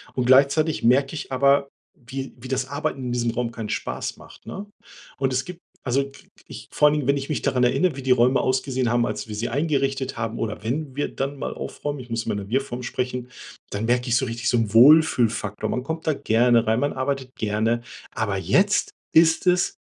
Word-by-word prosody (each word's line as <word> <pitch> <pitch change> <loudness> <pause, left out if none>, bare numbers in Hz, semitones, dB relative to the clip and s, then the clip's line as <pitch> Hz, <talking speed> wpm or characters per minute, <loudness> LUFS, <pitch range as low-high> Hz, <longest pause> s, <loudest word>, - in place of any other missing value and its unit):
Und 125 - 0
gleichzeitig 140 +5 +4
merke 135 +5 +3
ich 145 - -6
aber, 140 +1 +3 0.3
wie 135 -2 -7
wie 120 +2 -10
das 130 0 -1
Arbeiten 145 -1 -3
in 125 - -3
diesem 120 -1 0
Raum 115 0 -2
keinen 110 -2 -6
Spaß - - -3
macht, - - -16
ne? 200 - -7 0.5
Und 135 -1 0
es 130 - 0
gibt 180 -1 -9 0.2
also 135 +2 +1
k - - -18 0.2
ich - - -10
vor 150 - +4
allen 150 - +3
Dingen, 145 -4 -2
wenn 140 - +4
ich 135 0 -5
mich 145 -7 -1
daran 125 -1 +1
erinnere, 135 +6 +2
wie 135 - -7
die 130 - +1
Räume 125 +1 +4
ausgesehen 130 -1 0
haben, 120 0 +2
als - - -4
wir 105 - -5
sie 110 +3 -2
eingerichtet 135 -1 -1
haben, 115 0 -3
oder 105 -2 -3
wenn 135 +4 -3
wir 145 - 0
dann 140 +1 -3
mal - - -3
aufräumen 145 -1 -5
ich 125 -1 -10
muss 115 -1 -2
immer - - -1
in 100 - -2
der 100 0 -8
Wir-Form 125 0 -2
sprechen 125 0 -3 0.4
dann 105 +2 -2
merke 125 +2 +1
ich 120 - +3
so 130 - 0
richtig 120 -1 -2
so 120 - +2
'n 110 -3 -1
Wohlfühlfaktor. 115 -6 +4
Man 125 - -2
kommt 160 +2 -5
da 155 - +3
gerne 120 -2 +2
rein, 110 +1 +2
man 145 +2 0
arbeitet 130 -1 -3
gerne, 110 +2 0 0.3
aber 105 -3 -1
jetzt 200 - +2 0.2
ist 160 +2 +4
es 180 0 +2
130 Hz, 220 wpm, -23 LUFS, 120-140 Hz, 0.5 s, gleichzeitig